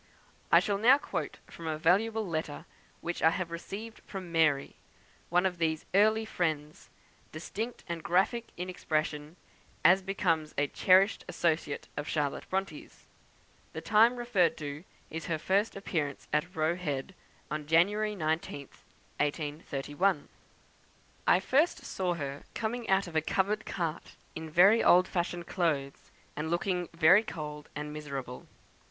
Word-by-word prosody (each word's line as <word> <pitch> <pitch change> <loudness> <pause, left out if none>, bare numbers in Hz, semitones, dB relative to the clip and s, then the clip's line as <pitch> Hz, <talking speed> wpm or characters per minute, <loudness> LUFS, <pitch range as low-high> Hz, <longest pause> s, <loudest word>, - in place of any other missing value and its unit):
I - - +8
shall 200 -1 -1
now 250 +6 +7
quote - - -4
from 165 - -9
a 155 -1 -1
valuable 210 +7 +2
letter 155 -3 -4 0.4
which 175 0 -4
I 160 - +6
have 170 0 -3
received 205 +6 -7
from 185 -3 -7
"Mary," 155 -4 +2 0.5
one 180 +2 +3
of 180 -2 -1
these 160 -2 0
early 215 +3 +4
friends; 155 -7 -3 0.4
distinct 220 +9 -5
and 170 -2 -4
graphic 195 +8 +1
in 180 +1 -4
expression, 155 -3 -2 0.5
as 185 +4 +7
becomes 165 -5 -1
a 145 - +3
cherished 190 +7 +4
associate 160 -3 -1
of 145 - -4
Charlotte 145 -3 -2
Bronte's. 195 +1 -4 0.7
The - - -5
time 225 +3 +5
referred 195 -9 +2
to 150 +2 -6 0.3
is 160 0 -5
her 165 -2 0
first 195 +7 +1
appearance 155 -8 -3
at 175 +5 0
Roe 160 +2 +1
Head, 150 -1 -3 0.4
on 150 -1 -3
January 205 +7 +3
19th, 155 -4 -3 0.4
1831. 145 +3 -1 1.0
"I - - +6
first 280 - +1
saw 180 -2 -1
her 140 -3 -5
coming 230 +1 -3
out 195 +1 +3
of 170 -3 -10
a 160 - +3
covered 200 +6 0
cart, 170 -3 -4 0.2
in 160 0 -6
very 195 +8 +6
old 180 +1 +6
fashioned 175 -1 -2
clothes, 150 -8 -2 0.3
and 150 +2 -3
looking 175 +1 -1
very 170 +4 +6
cold 150 -7 -7
and 150 0 -5
miserable. 140 -4 -6
170 Hz, 140 wpm, -30 LUFS, 155-195 Hz, 1.0 s, I